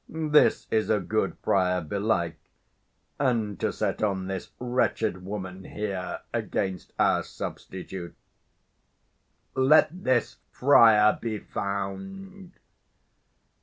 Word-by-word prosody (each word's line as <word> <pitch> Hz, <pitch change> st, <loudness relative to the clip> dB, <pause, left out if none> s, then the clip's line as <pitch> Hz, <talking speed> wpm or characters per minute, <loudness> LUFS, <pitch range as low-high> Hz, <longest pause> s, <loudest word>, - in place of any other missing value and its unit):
this's 155 Hz, -2 st, +3 dB, 0.2 s
a 110 Hz, -, +3 dB
good 105 Hz, -1 st, -1 dB
friar, 90 Hz, -1 st, +2 dB
belike! 95 Hz, +1 st, -1 dB, 0.8 s
And 115 Hz, -7 st, 0 dB
to -, -, 0 dB
set -, -, -2 dB
on 95 Hz, -3 st, 0 dB
this 95 Hz, -1 st, -5 dB
wretched 120 Hz, -6 st, 0 dB
woman 95 Hz, -1 st, -6 dB
here 100 Hz, -3 st, -4 dB
Against 95 Hz, -1 st, -2 dB
our -, -, +3 dB
substitute! 90 Hz, -1 st, -7 dB, 1.4 s
Let 135 Hz, +4 st, +5 dB
this 130 Hz, -3 st, +1 dB
friar 110 Hz, -6 st, +5 dB
be 110 Hz, -2 st, -2 dB
found. 185 Hz, -, -5 dB
105 Hz, 90 wpm, -27 LUFS, 95-125 Hz, 1.4 s, Let